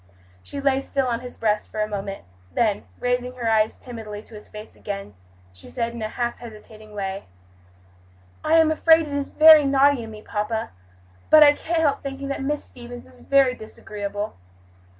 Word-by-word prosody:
She 280 Hz, -, -6 dB
lay 275 Hz, -1 st, +2 dB
still 275 Hz, 0 st, -1 dB
on 235 Hz, -2 st, -1 dB
his 250 Hz, -1 st, -10 dB
breast 210 Hz, -1 st, 0 dB
for 215 Hz, -, -6 dB
a 215 Hz, -, +1 dB
moment; 200 Hz, -, -5 dB, 0.3 s
then, 215 Hz, -4 st, 0 dB
raising 245 Hz, 0 st, -1 dB
her 240 Hz, -2 st, -3 dB
eyes 220 Hz, -1 st, +2 dB
timidly 220 Hz, -4 st, -8 dB
to -, -, -17 dB
his 210 Hz, -, -10 dB
face 210 Hz, +1 st, -11 dB
again, 200 Hz, -, -6 dB, 0.4 s
she 90 Hz, -, -11 dB
said 235 Hz, -2 st, -3 dB
in 235 Hz, -, -7 dB
a 215 Hz, -, -1 dB
half 240 Hz, +1 st, -3 dB
hesitating 215 Hz, -2 st, -12 dB
way, 195 Hz, -1 st, -4 dB, 1.2 s
"I 310 Hz, -, +1 dB
am 320 Hz, -1 st, +5 dB
afraid 320 Hz, 0 st, +4 dB
it 290 Hz, -, -6 dB
is 285 Hz, -1 st, -2 dB
very 310 Hz, -1 st, +8 dB
naughty 275 Hz, -1 st, +3 dB
in 225 Hz, -, -8 dB
me, 215 Hz, -1 st, -11 dB
papa, 220 Hz, +1 st, -3 dB, 0.6 s
but 310 Hz, 0 st, +9 dB
I 290 Hz, -1 st, +7 dB
can't 325 Hz, +2 st, -1 dB
help 290 Hz, -3 st, +1 dB
thinking 275 Hz, 0 st, -6 dB
that 275 Hz, -, -3 dB
Miss 295 Hz, +2 st, -2 dB
Stevens 245 Hz, 0 st, -11 dB
is 255 Hz, -1 st, -17 dB
very 275 Hz, -2 st, +3 dB
disagreeable. 210 Hz, -2 st, -6 dB
240 Hz, 185 wpm, -23 LUFS, 215-275 Hz, 1.2 s, but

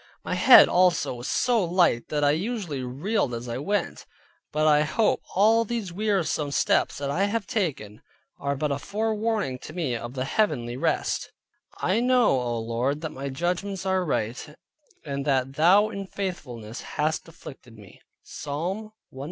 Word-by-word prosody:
My -, -, -3 dB
head -, -, +8 dB
also 180 Hz, -5 st, +2 dB
was 120 Hz, 0 st, -7 dB
so 240 Hz, -4 st, +2 dB
light 170 Hz, -9 st, +2 dB
that 150 Hz, -1 st, -1 dB
I 145 Hz, -, +5 dB
usually 175 Hz, -, -3 dB
reeled 135 Hz, -, -1 dB
as 120 Hz, +1 st, -6 dB
I 120 Hz, +1 st, -3 dB
went; 200 Hz, +8 st, -2 dB, 0.4 s
but 155 Hz, +1 st, +1 dB
I 150 Hz, -1 st, +5 dB
hope 210 Hz, +9 st, +1 dB
all 220 Hz, +4 st, +5 dB
these 225 Hz, -5 st, -4 dB
wearisome 190 Hz, -7 st, 0 dB
steps 140 Hz, -, +1 dB
that 140 Hz, -1 st, -3 dB
I 190 Hz, +7 st, +1 dB
have 205 Hz, 0 st, -2 dB
taken, 155 Hz, -, -3 dB, 0.4 s
are 140 Hz, 0 st, -1 dB
but 150 Hz, +1 st, -1 dB
a 140 Hz, -, -1 dB
forewarning 215 Hz, -, -1 dB
to 155 Hz, -, -10 dB
me 155 Hz, -8 st, -2 dB
of 120 Hz, +2 st, -6 dB
the 130 Hz, 0 st, -2 dB
heavenly 135 Hz, -, 0 dB
rest: 160 Hz, +5 st, -1 dB, 0.5 s
"I 190 Hz, +5 st, +1 dB
know, 250 Hz, -1 st, +4 dB
O 120 Hz, -1 st, -2 dB
Lord, 120 Hz, +6 st, -1 dB
that 160 Hz, -, -5 dB
thy 140 Hz, +1 st, -5 dB
judgments 180 Hz, +7 st, -2 dB
are 190 Hz, -1 st, +1 dB
right, 135 Hz, 0 st, -3 dB, 0.5 s
and 140 Hz, -1 st, -3 dB
that 135 Hz, -1 st, +1 dB
thou 185 Hz, +8 st, +5 dB
in 200 Hz, -2 st, -6 dB
faithfulness 125 Hz, -, -6 dB, 0.2 s
hast 155 Hz, +2 st, 0 dB
afflicted 130 Hz, -7 st, -13 dB
me" 100 Hz, -4 st, -16 dB, 0.2 s
(Psalm 180 Hz, +9 st, -5 dB, 0.2 s
119. 130 Hz, -, -12 dB
155 Hz, 165 wpm, -25 LUFS, 135-200 Hz, 0.5 s, head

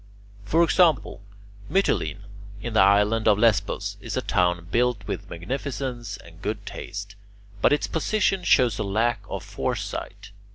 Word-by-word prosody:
For 165 Hz, +10 st, +3 dB
example, 165 Hz, -, +3 dB, 0.5 s
Mytilene 185 Hz, -, 0 dB, 0.4 s
in 115 Hz, +2 st, -5 dB
the 110 Hz, -, +3 dB
island 105 Hz, +3 st, +4 dB
of 105 Hz, -2 st, +5 dB
Lesbos 105 Hz, -2 st, +1 dB
is -, -, -4 dB
a -, -, +1 dB
town 90 Hz, -1 st, +1 dB
built 120 Hz, -4 st, +1 dB
with -, -, -5 dB
magnificence 120 Hz, -, -4 dB
and 80 Hz, 0 st, -15 dB
good 105 Hz, 0 st, -4 dB
taste, 100 Hz, 0 st, -7 dB, 0.5 s
but -, -, +5 dB
its 145 Hz, -, +2 dB
position 195 Hz, +2 st, 0 dB
shows 120 Hz, -, +3 dB
a -, -, 0 dB
lack 110 Hz, +4 st, +1 dB
of -, -, -4 dB
foresight. 100 Hz, -1 st, -4 dB
110 Hz, 140 wpm, -25 LUFS, 100-130 Hz, 0.5 s, of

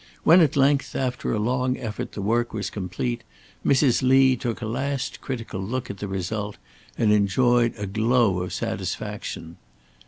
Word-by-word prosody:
When 175 Hz, +3 st, +7 dB
at 155 Hz, -5 st, +3 dB
length, 140 Hz, 0 st, +2 dB
after 125 Hz, -2 st, -1 dB
a -, -, 0 dB
long 125 Hz, +4 st, 0 dB
effort, 110 Hz, -4 st, -5 dB
the 100 Hz, -, -5 dB
work 120 Hz, +3 st, 0 dB
was 105 Hz, -, -3 dB
complete, 105 Hz, +5 st, -3 dB, 0.4 s
Mrs. 135 Hz, -2 st, +3 dB
Lee 130 Hz, 0 st, +5 dB
took 120 Hz, -1 st, -3 dB
a 115 Hz, -, -4 dB
last 135 Hz, +4 st, -3 dB
critical 115 Hz, -7 st, -5 dB
look 125 Hz, +5 st, -3 dB
at 100 Hz, -, -10 dB
the 105 Hz, -, -4 dB
result, 100 Hz, +2 st, -3 dB, 0.4 s
and 105 Hz, -2 st, +3 dB
enjoyed 120 Hz, +4 st, +3 dB
a 105 Hz, -, -3 dB
glow 110 Hz, -1 st, +2 dB
of 90 Hz, -, -4 dB
satisfaction. 80 Hz, +1 st, -4 dB
120 Hz, 160 wpm, -24 LUFS, 105-130 Hz, 0.4 s, When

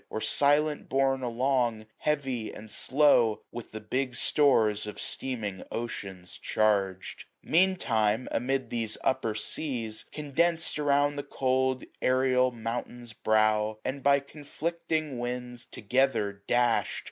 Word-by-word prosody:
Or -, -, -3 dB
silent 145 Hz, +5 st, +2 dB
borne 135 Hz, 0 st, +2 dB
along, 120 Hz, -2 st, 0 dB
heavy, 135 Hz, -7 st, -1 dB
and 110 Hz, 0 st, -10 dB
slow, 125 Hz, -4 st, +3 dB
With 120 Hz, -, -8 dB
the 110 Hz, -, -6 dB
big 125 Hz, +4 st, -2 dB
stores 110 Hz, -10 st, +2 dB
of 105 Hz, -, -7 dB
steaming 110 Hz, -8 st, -4 dB
oceans 95 Hz, -6 st, -6 dB
charged. 100 Hz, -3 st, 0 dB, 0.2 s
Meantime, 130 Hz, -, +2 dB
amid 130 Hz, +2 st, -1 dB
these 115 Hz, -2 st, -2 dB
upper 130 Hz, -5 st, 0 dB
seas, 115 Hz, -2 st, -4 dB
condensed 160 Hz, +3 st, 0 dB
795 150 Hz, -1 st, -3 dB
Around 145 Hz, +1 st, +3 dB
the 145 Hz, -, -7 dB
cold 130 Hz, 0 st, +1 dB, 0.2 s
aerial 130 Hz, 0 st, +3 dB
mountain's 120 Hz, 0 st, -5 dB
brow, 110 Hz, 0 st, +2 dB
And 135 Hz, +2 st, -3 dB
by 140 Hz, +1 st, +4 dB
conflicting 155 Hz, 0 st, -3 dB
winds 125 Hz, 0 st, -5 dB
together 110 Hz, -3 st, 0 dB
dash*d. 120 Hz, -1 st, +2 dB
125 Hz, 120 wpm, -28 LUFS, 110-140 Hz, 0.2 s, by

